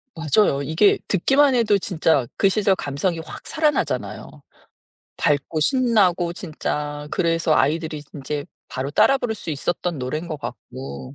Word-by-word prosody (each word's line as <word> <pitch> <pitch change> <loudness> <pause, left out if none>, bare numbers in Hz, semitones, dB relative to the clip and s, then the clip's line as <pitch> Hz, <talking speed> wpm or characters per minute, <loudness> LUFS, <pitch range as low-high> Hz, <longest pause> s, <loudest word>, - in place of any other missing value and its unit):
맞아요. 160 -2 +2
이게 160 +8 +3
듣기만 270 +8 +3
해도 215 -4 +3
진짜 160 -8 +1
그 195 - +4
시절 195 -1 +2
감성이 165 +4 -2
확 160 - -9
살아나잖아요. 310 -1 -1 0.9
밝고 145 +2 0
신나고 195 - +2
진짜 150 -3 -4
그래서 165 -2 +1
아이들이 155 +1 0
인제 145 +1 -4 0.2
바로 135 +2 -4
따라 275 - +4
부를 230 -3 -2
수 175 - -10
있었던 170 +3 -2
노래인 155 +7 -4
것 155 - -3
같고. 70 - -8
165 Hz, 305 characters per minute, -22 LUFS, 145-200 Hz, 0.9 s, 그